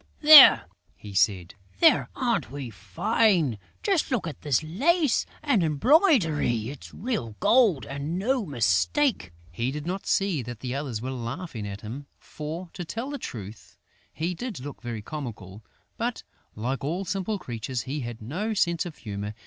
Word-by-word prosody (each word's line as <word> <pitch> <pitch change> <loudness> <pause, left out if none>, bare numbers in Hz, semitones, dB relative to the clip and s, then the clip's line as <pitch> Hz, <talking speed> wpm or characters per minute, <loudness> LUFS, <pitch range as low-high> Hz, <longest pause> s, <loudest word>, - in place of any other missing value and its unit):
"There!" 300 -2 +10 0.3
he 105 -1 -11
said. 95 -3 +1 0.3
"There! - - +5
Aren't - - 0
we 135 -3 -6
fine!... 150 - +1 0.2
Just 385 -6 +1
look 245 -10 -1
at 160 - -7
this 145 -1 +1
lace 280 - +1 0.2
and 275 -10 +2
embroidery!... 160 - +3
It's 140 -1 -10
real 190 - -4
gold 220 - +4
and 140 +5 -4
no 245 +5 0
mistake!" 125 - +1 0.2
He 115 +9 -2
did 145 +2 -5
not 185 +3 -4
see 195 -7 +1
that 120 -1 -8
the 125 -1 -4
others 130 -6 -4
were 130 - -3
laughing 120 - -5
at 100 0 -7
him, 130 +7 -8
for, 165 +3 -7
to 180 - -5
tell 230 - -5
the 285 - -5
truth, 105 - -9 0.3
he 170 +3 -3
did 215 - -6
look 140 +1 -8
very 120 -3 -5
comical; 110 -8 -7 0.3
but, - - -3 0.3
like 125 +4 -3
all 175 +7 -2
simple 195 +3 -2
creatures, 120 - -5
he 140 +3 -4
had 120 -3 -6
no 195 - -3
sense 170 -3 +1
of 165 - -10
humour. 105 -1 -6
145 Hz, 160 wpm, -26 LUFS, 115-195 Hz, 0.3 s, There